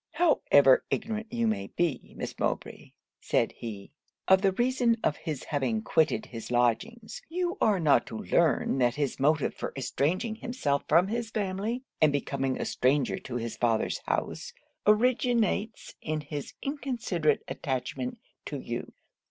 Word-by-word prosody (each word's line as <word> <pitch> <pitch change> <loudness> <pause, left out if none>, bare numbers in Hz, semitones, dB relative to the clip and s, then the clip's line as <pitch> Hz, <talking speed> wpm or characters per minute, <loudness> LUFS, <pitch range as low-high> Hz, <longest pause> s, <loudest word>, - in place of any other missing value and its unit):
'However 145 - +5
ignorant 220 0 -3
you 235 -1 0
may 220 -2 0
be, 165 -8 -2
Miss - - -6
Mowbray,' - - -3 0.3
said - - +1
he, 105 -4 -8 0.4
'of 190 0 +6
the 195 -1 +3
reason 240 +1 +2
of 150 - +2
his 155 -5 -5
having 130 -7 -1
quitted 160 +6 +2
his 115 -2 -8
lodgings, 180 - 0
you 355 +2 -1
are 205 -3 +3
not 155 -4 +3
to - - -6
learn 165 - +2
that 120 -1 +3
his 145 -3 -2
motive 150 +1 +2
for - - -5
estranging 180 - 0
himself 220 - -1
from 170 +5 +4
his 235 0 -2
family, 215 +4 -2 0.2
and 155 -1 +6
becoming 135 -2 -1
a - - -1
stranger 130 +1 +1
to 125 - -7
his 115 -1 -3
father's 115 -2 +1
house, - - -2 0.3
originates 225 -1 +2
in 155 -1 -2
his 145 -1 -6
inconsiderate 235 - 0
attachment 190 - -3 0.3
to - - -4
you. - - -5
170 Hz, 145 wpm, -28 LUFS, -, 0.4 s, of